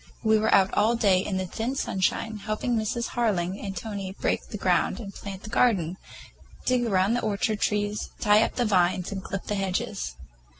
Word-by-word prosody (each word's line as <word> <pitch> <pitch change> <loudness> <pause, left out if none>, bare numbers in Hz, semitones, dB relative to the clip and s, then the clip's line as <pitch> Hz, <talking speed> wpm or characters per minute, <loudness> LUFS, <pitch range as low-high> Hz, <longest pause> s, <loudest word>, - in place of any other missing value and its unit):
We 220 -1 +4
were 220 - +1
out 195 -1 +4
all 225 +3 +3
day 200 -5 +4
in 195 -2 -2
the 185 - -1
thin 225 +8 -3
sunshine, 215 0 -1
helping 215 +4 -2
Mrs. 225 +2 -1
Harling 200 -5 -1
and 195 -1 -4
Tony 200 -4 -5
break - - 0
the - - -6
ground - - +1
and 200 -4 -7
plant 195 -1 -8
the 215 - -7
garden, 190 -8 +2 0.7
dig 250 -1 +2
around 195 +1 +2
the 245 - 0
orchard 215 +1 0
trees, 210 0 -1
tie 210 +1 +5
up - - 0
vines 185 -5 +2
and 195 -1 -4
clip 195 - -4
the - - -2
hedges. 180 - -2
205 Hz, 185 wpm, -26 LUFS, 190-220 Hz, 0.7 s, tie